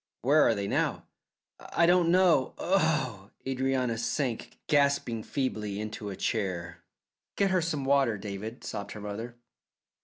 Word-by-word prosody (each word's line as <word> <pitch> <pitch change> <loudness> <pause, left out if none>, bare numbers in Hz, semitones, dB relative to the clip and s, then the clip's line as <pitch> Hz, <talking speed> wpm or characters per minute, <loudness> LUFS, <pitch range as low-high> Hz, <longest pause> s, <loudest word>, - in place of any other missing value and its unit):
"Where 145 +5 +5
are 115 - +3
they 100 -1 -2
now?" - - 0 0.5
"I 170 - +1
don't 175 -1 +4
know. 175 -7 +4
Oh!" 150 - 0 0.2
Adrianna 130 -3 0
sank 120 -1 -2
gasping 140 -6 +2
feebly 110 -7 -2
into 105 -1 -5
a 95 - -5
chair. 90 -6 -2 0.6
"Get 200 -1 +2
her 185 -1 +3
some 155 -4 -2
water, 135 -5 +3
David," 105 +3 -6
sobbed 100 0 -5
her 105 - -8
mother. 110 +4 -6
125 Hz, 140 wpm, -29 LUFS, 105-145 Hz, 0.6 s, Where